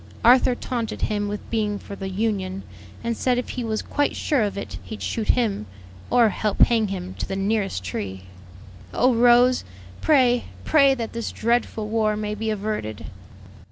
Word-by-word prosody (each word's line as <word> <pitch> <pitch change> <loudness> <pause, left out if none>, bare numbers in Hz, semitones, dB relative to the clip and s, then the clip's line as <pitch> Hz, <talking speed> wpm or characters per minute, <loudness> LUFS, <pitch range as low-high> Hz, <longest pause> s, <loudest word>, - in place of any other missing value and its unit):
Arthur 250 +1 +6
taunted 240 -2 -4
him 205 -1 0
with 205 0 -5
being 210 -2 0
for 200 - -9
the 195 -1 -5
Union, 195 -2 -2 0.4
and 235 0 -1
said 250 +2 +1
if 245 - -3
he 250 - -4
was 220 -1 -2
quite 290 - 0
sure 285 -5 +1
of 205 -2 -1
it - - -6
he'd 220 - -8
shoot 220 -2 -2
him, 210 - +1 0.4
or 235 -3 +5
help 210 0 -2
hang 225 -3 +5
him 185 -1 -5
to - - -3
the 195 - -3
nearest 195 - -1
tree. 95 +1 -5 0.7
"Oh, 255 +1 +4
Rose! 245 +2 +5 0.4
pray, 250 -5 +3 0.2
pray 275 -3 +5
that 230 -3 -5
this 230 0 -3
dreadful 235 -2 0
war 215 -1 +1
may 210 0 -3
be 220 +1 -3
averted!" 210 - -3
220 Hz, 170 wpm, -23 LUFS, 200-240 Hz, 0.7 s, Arthur